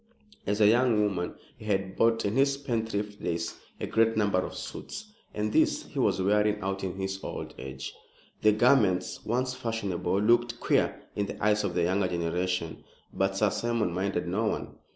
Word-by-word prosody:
As 105 +1 0
a 105 - +6
young 110 -3 +4
man 90 0 -3 0.2
he - - -10
had 95 -2 -1
bought, 115 -1 +3
in 100 - 0
his 140 +1 +4
spendthrift 110 -6 -3
days, 85 0 -3 0.2
a - - -2
great 115 0 +2
number 100 -3 +2
of - - -4
suits, 210 +1 -7 0.2
and 105 0 -2
these - - +3
he - - -6
was - - +2
wearing 105 +2 +2
out 95 0 -2
in 95 -1 -3
his 95 0 -4
old - - -5
age. 65 0 -6 0.5
The 110 - +6
garments, 105 -4 +3
once 125 +3 0
fashionable, 100 -6 -1
looked 120 +2 +3
queer - - +1
in 100 -1 -1
the - - -7
eyes 105 0 +3
of 90 -3 -2
a 85 - +3
younger 95 +2 +2
generation; 85 0 -2 0.3
but 95 0 0
Sir 105 0 +3
Simon 115 -6 0
minded 95 -1 -1
no 100 +6 0
one. - - -3
105 Hz, 180 wpm, -28 LUFS, 95-115 Hz, 0.5 s, a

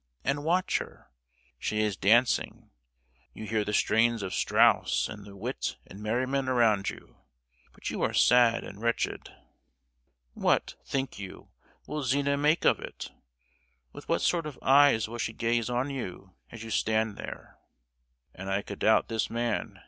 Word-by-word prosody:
and 140 +2 -1
watch 175 +4 +1
her. - - -11 0.5
She 105 0 -1
is 105 -2 0
dancing. 115 +7 +2 0.6
You 110 - -7
hear 110 0 0
the 105 - -3
strains 115 +1 +2
of 95 - -4
Strauss, - - +3
and 105 -2 -9
the 100 - -12
wit 120 +7 -4
and 100 +3 -12
merriment 130 +5 -1
around 115 -6 +3
you, - - -12 0.5
but - - -6
you - - -4
are - - +1
sad 120 -2 +4
and 100 +2 -10
wretched. 115 0 -2 1.0
"What, - - +1
think 135 -5 -3
you, 95 -2 -9 0.4
will 150 0 -4
Zina 140 +2 +1
make 150 +3 +2
of - - +4
it? - - -8 0.8
With - - -12
what - - +1
sort 170 -3 +1
of 145 - -8
eyes 135 -5 +5
will 120 +2 -7
she 110 - -2
gaze 115 0 0
on 125 +3 -1
you 95 -8 -7 0.2
as 115 -1 -9
you 115 - -7
stand 110 0 +1
there? - - -9 0.7
'And 95 +1 -7
I 100 +1 0
could 100 - -8
doubt 110 - +3
this 110 -1 -2
man! 115 -1 -2
115 Hz, 160 wpm, -28 LUFS, 105-135 Hz, 1.0 s, eyes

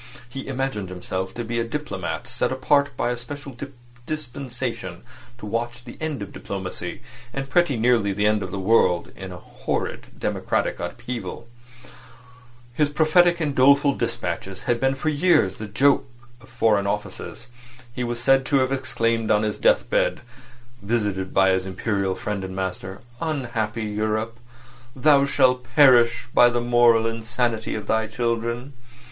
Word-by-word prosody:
He 135 +3 -7
imagined 135 -8 -2
himself 95 +1 -4
to 120 - -3
be 115 +1 -2
a - - +1
diplomatist 150 +6 -4
set - - +1
apart 140 +2 +2
by 120 - 0
a 120 - -2
special 140 +2 -8 0.5
dispensation 125 - -5 0.3
to 120 - -9
watch 120 +3 -3
the 120 - -11
end 155 -9 -2
of 100 - -10
diplomacy, 95 -2 -6 0.3
and 135 +1 -5
pretty 175 -7 +3
nearly 115 -3 +3
the 105 +2 0
end 105 0 +3
of 95 - -4
the 100 - -5
world, 95 -3 +2
in 95 -1 -8
a 90 - -7
horrid - - -4
democratic - - -1
upheaval. 120 -1 -5 1.3
His 150 +3 +2
prophetic 170 +3 +4
and 150 -3 -1
doleful 140 +2 +5
despatches 95 -6 -3
had 120 -1 +1
been 135 +1 +2
for 155 - -1
years 145 - +3
the 110 - -6
joke 135 +8 +3 0.3
of 130 - -17
Foreign 110 -4 +2
Offices. 105 +1 -4 0.5
He 125 - -3
was 120 0 -3
said 135 +3 +4
to 145 - +1
have 130 -1 +3
exclaimed 115 -4 0
on 105 0 +3
his 105 -1 -2
deathbed - - +2 0.6
(visited 100 -3 -1
by 95 0 +4
his 95 0 +1
Imperial 95 0 -1
friend 105 -2 -4
and 95 0 -6
master): 95 0 -4 0.2
"Unhappy 120 -8 -2
Europe! 110 +2 -2 0.6
Thou 140 +1 +5
shalt 130 -2 +3
perish 125 -5 +6
by 120 - +7
the 120 0 0
moral 120 -1 +4
insanity 115 0 -1
of 105 - -5
thy 110 0 +1
children!" 115 +3 -2
120 Hz, 150 wpm, -23 LUFS, 105-135 Hz, 1.3 s, by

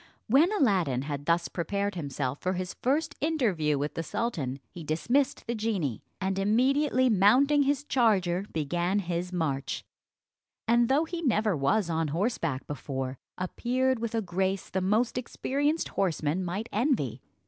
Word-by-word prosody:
When 290 - +4
Aladdin 185 - +2
had 145 0 -5
thus 170 0 +2
prepared 200 +3 -2
himself 140 -5 -3
for 185 - 0
his 185 0 -4
first 285 +4 +1
interview 210 - +1
with 145 +2 -2
the - - -3
sultan, 150 - -3
he 175 -3 -8
dismissed 235 - 0
the 235 - -2
genie, 205 - -1 0.2
and 190 0 -1
immediately 255 +6 +3
mounting 250 +8 +5
his 285 0 +1
charger, 200 -10 +2
began 175 +5 0
his 180 -2 -2
march, 150 -6 -2 0.8
and 235 +1 +4
though 290 +5 +3
he 335 +1 -5
never 215 - +2
was 155 +8 +1
on 165 -1 0
horseback 165 - -1
before, 135 -2 -4 0.2
appeared 250 +7 0
with 230 0 -3
a 225 - 0
grace 190 +2 -1
the 190 - 0
most 220 +6 +1
experienced 290 +5 -1
horseman 170 -2 0
might 190 +6 -3
envy. 205 - 0
195 Hz, 150 wpm, -28 LUFS, 165-245 Hz, 0.8 s, mounting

